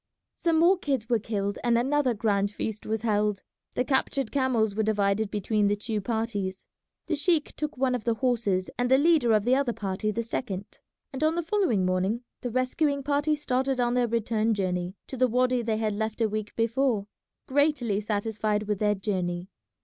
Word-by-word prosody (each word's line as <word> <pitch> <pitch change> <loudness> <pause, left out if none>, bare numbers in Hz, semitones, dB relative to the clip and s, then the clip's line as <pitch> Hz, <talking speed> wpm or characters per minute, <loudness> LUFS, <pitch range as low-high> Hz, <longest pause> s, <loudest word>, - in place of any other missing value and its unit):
Some 335 -2 +1
more 355 +3 +5
kids 270 -9 -2
were 235 -2 +3
killed 200 -1 -2
and 240 -1 +3
another 265 0 +1
grand 200 -2 +1
feast 215 +1 -5
was 220 0 -2
held. 210 -3 +1 0.3
The 250 - +2
captured 265 -1 0
camels 250 -6 +1
were 220 - 0
divided 210 -1 +1
between 210 0 +1
the 205 - +2
two 215 0 -2
parties. 205 -3 -3 0.4
The - - -2
sheik 310 +1 +1
took 300 -3 -4
one 255 0 +1
of 245 -3 -2
the 230 -1 +1
horses 220 -7 0
and 245 0 +1
the 265 - +6
leader 295 -5 +4
of 215 -2 +4
the 245 - +3
other 265 -3 +2
party 195 0 -2
the 230 +2 -1
second, 205 -4 -5 0.3
and 270 +3 -3
on 315 +1 +3
the 345 - -1
following 320 - +1
morning 185 +6 0 0.2
the 245 - -3
rescuing 275 +4 0
party 290 +2 +1
started 265 -2 -1
on 240 0 +2
their 245 -1 +2
return 225 -1 0
journey 180 -1 -2
to 265 - -7
the 255 +1 +4
wady 250 +1 +2
they 225 -2 -1
had 215 -1 0
left 220 +2 -3
a 225 - +3
week 215 0 -4
before, 230 -2 +1 0.4
greatly 265 -7 +1
satisfied 210 0 -1
with 210 -2 -2
their 210 -1 +2
journey. 185 -2 -2
225 Hz, 190 wpm, -27 LUFS, 205-260 Hz, 0.4 s, the